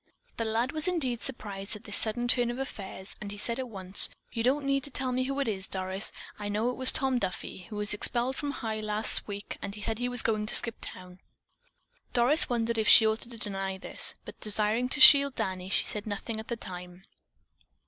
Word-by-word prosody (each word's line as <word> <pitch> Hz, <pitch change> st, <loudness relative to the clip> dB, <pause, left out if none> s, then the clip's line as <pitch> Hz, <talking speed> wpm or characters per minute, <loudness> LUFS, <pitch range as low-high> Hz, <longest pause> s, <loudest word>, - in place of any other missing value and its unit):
The 230 Hz, -, -2 dB
lad 230 Hz, +4 st, -1 dB
was 310 Hz, +1 st, -1 dB
indeed 265 Hz, -10 st, -1 dB
surprised 205 Hz, -6 st, -4 dB
at 210 Hz, -, -12 dB
this 205 Hz, -, -2 dB
sudden 240 Hz, +3 st, -1 dB
turn 245 Hz, -1 st, +2 dB
of 240 Hz, -, -4 dB
affairs 195 Hz, -7 st, -7 dB
and 205 Hz, -1 st, -6 dB
he 205 Hz, -, -8 dB
said 235 Hz, +4 st, 0 dB
at 255 Hz, -2 st, -5 dB
once: 190 Hz, -2 st, +4 dB, 0.2 s
"You 230 Hz, -, -3 dB
don't 270 Hz, +4 st, +1 dB
need 275 Hz, -1 st, 0 dB
to -, -, -7 dB
tell 260 Hz, -1 st, -3 dB
me 255 Hz, +1 st, -1 dB
who 275 Hz, +1 st, -3 dB
it 275 Hz, -, -1 dB
is, 195 Hz, -3 st, 0 dB
Doris. 190 Hz, +1 st, -4 dB, 0.3 s
I 205 Hz, 0 st, -4 dB
know 215 Hz, +4 st, 0 dB
it -, -, -7 dB
was 260 Hz, 0 st, +7 dB
Tom 265 Hz, -2 st, +1 dB
Duffy. 185 Hz, -2 st, -5 dB
He 215 Hz, -, -8 dB
was 210 Hz, 0 st, +1 dB
expelled 240 Hz, +4 st, +1 dB
from 290 Hz, 0 st, -4 dB
High 225 Hz, -6 st, -4 dB
last 215 Hz, 0 st, 0 dB
week 205 Hz, -1 st, -7 dB
and 200 Hz, -, -6 dB
he 210 Hz, -, -9 dB
said 220 Hz, +1 st, -1 dB
he 245 Hz, 0 st, -1 dB
was 245 Hz, -1 st, 0 dB
going 215 Hz, -1 st, -1 dB
to -, -, +1 dB
skip 235 Hz, -2 st, +1 dB
the -, -, -4 dB
town." 180 Hz, 0 st, -12 dB, 0.9 s
Doris 250 Hz, +6 st, +5 dB
wondered 230 Hz, -1 st, -1 dB
if 215 Hz, -, 0 dB
she 220 Hz, -, +8 dB
ought 220 Hz, +1 st, +1 dB
to 235 Hz, -1 st, -7 dB
deny 195 Hz, -2 st, -4 dB
this, -, -, -1 dB
but, -, -, -11 dB
desiring 215 Hz, +3 st, +2 dB
to 295 Hz, -, -3 dB
shield 280 Hz, -2 st, +9 dB
Danny, 185 Hz, 0 st, -4 dB
she -, -, +1 dB
said 210 Hz, 0 st, -6 dB
nothing 215 Hz, +2 st, -5 dB
at 220 Hz, -, -9 dB
the 235 Hz, -, -3 dB
time. 180 Hz, -2 st, -9 dB
220 Hz, 230 wpm, -28 LUFS, 205-250 Hz, 0.9 s, shield